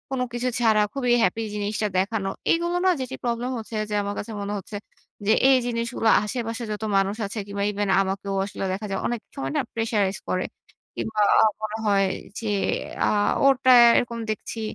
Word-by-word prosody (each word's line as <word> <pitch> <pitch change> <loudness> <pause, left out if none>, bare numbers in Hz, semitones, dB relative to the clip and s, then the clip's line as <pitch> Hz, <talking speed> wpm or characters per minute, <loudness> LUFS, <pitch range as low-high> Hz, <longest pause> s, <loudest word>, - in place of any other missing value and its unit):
কোন 255 - -2
কিছু 245 +1 -1
ছাড়া 220 -3 +4
খুবই 250 -3 +1
হ্যাপি 185 +5 +1
জিনিসটা 210 +1 -1
দেখানো। 195 0 -1 0.2
এগুলো 345 +1 +1
না 375 - +6
যেটি 260 0 -4
প্রবলেম 240 +1 -1
হচ্ছে 225 0 -7
যে, - - -4
আমার 200 0 -3
কাছে 215 - -6
মনে 200 +1 -3
হচ্ছে 205 +2 -8 0.5
যে, - - +5 0.2
এই 265 - +6
জিনিসগুলো 230 -1 0
আশেপাশে 230 +2 -3
যত 210 +1 -4
মানুষ 195 +1 +1
আছে 200 +3 -6
কিংবা 200 0 -3
ইভেন 205 0 -2
আমাকেও 195 +1 -3
আসলে 200 - -6
দেখা 200 +3 -4
যায়। 195 - -1
অনেক 240 -1 -2 0.2
সময় 135 0 -3
না - - +3
pressurized 210 -4 0
করে। 185 - 0 0.5
কিংবা 220 -1 -2 0.4
মনে 215 0 -3
হয় 200 -1 +3 0.3
যে, 230 - -7 0.6
আ - - +2 0.4
ওরটা 265 -1 +5 0.3
এরকম 235 -1 -1
দেখছি, 215 +1 -4
220 Hz, 175 wpm, -24 LUFS, 200-240 Hz, 0.6 s, না